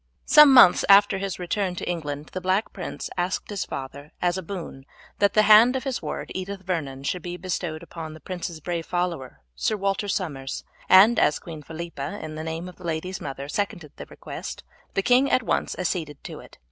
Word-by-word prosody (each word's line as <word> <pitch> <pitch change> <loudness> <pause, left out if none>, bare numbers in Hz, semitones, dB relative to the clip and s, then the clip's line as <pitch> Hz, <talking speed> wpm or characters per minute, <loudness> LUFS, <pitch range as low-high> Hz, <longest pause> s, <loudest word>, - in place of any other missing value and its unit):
Some 300 -2 +8
months 245 -9 +8
after 200 0 +6
his 195 -1 -3
return 180 +1 -2
to - - -5
England 150 -4 -4
the 185 - -4
Black 185 +4 0
Prince 180 - -6
asked 180 +4 -2
his 200 - -2
father 140 +2 -7
as 175 0 +1
a 190 - -3
boon 165 -7 -8 0.3
that 200 0 +3
the 215 - +6
hand 220 +4 +7
of 260 - -2
his 265 -2 -3
ward - - -5
Edith 190 +1 -5
Vernon 145 -7 -3
should 180 +5 -2
be 175 +1 -6
bestowed 175 -3 -4
upon 160 -2 -8
the - - -12
prince's 175 -1 -6
brave 170 0 -3
follower 175 -7 -3
Sir 215 - -1
Walter 195 +1 -1
Somers, 145 -9 -3 0.3
and 210 +5 +7
as 150 - +3
Queen 160 -3 -9
Philippa, 160 +2 -6
in 155 - -7
the 155 0 -6
name 160 +2 -4
of 180 - -11
the - - -14
lady's 170 +3 -3
mother, 140 0 -6
seconded 175 -3 -3
the - - -9
request, - - -8 0.3
the 195 - +1
king 255 +4 +4
at 255 - +2
once - - -1
acceded 165 -5 -3
to - - -8
it. - - -15
180 Hz, 200 wpm, -25 LUFS, 155-195 Hz, 0.3 s, Some